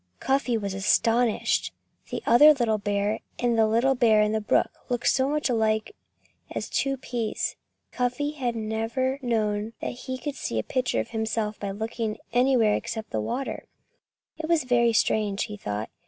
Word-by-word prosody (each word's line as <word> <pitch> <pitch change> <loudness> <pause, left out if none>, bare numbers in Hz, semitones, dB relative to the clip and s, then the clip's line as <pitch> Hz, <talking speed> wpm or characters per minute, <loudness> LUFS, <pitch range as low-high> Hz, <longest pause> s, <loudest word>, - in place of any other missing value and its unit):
Cuffy 265 -3 +1
was 200 -3 -3
astonished. 225 +4 +2 0.4
The - - -4
other 295 +6 +7
little 225 -5 +1
bear 205 +1 -1 0.2
and 240 -1 +1
the 220 -1 +4
little 235 +5 +3
bear 225 -4 +4
in 210 - +1
the 220 0 0
brook 210 - +2 0.2
looked 245 -1 -2
as - - +3
much 295 +3 +1
alike 220 - 0 0.5
as - - -5
two 275 0 0
peas. 240 -3 -3 0.4
Cuffy 250 +4 -1
had 255 -6 -2
never 225 +5 -1
known 215 -3 -1
that - - -3
he 260 +1 -6
could 290 +2 -4
see 115 - -3
a 110 - 0
picture 255 -1 0
of - - -8
himself 220 -1 -2
by 200 - -3
looking 220 +2 -3 0.2
anywhere 245 -4 +4
except 220 0 -4
into 110 - -2
water. 255 - -4 0.7
It 315 0 -4
was 335 -4 +3
very 240 -2 +3
strange, 210 -2 +1
he 210 - -6
thought. 105 - -4
230 Hz, 170 wpm, -26 LUFS, 215-255 Hz, 0.7 s, other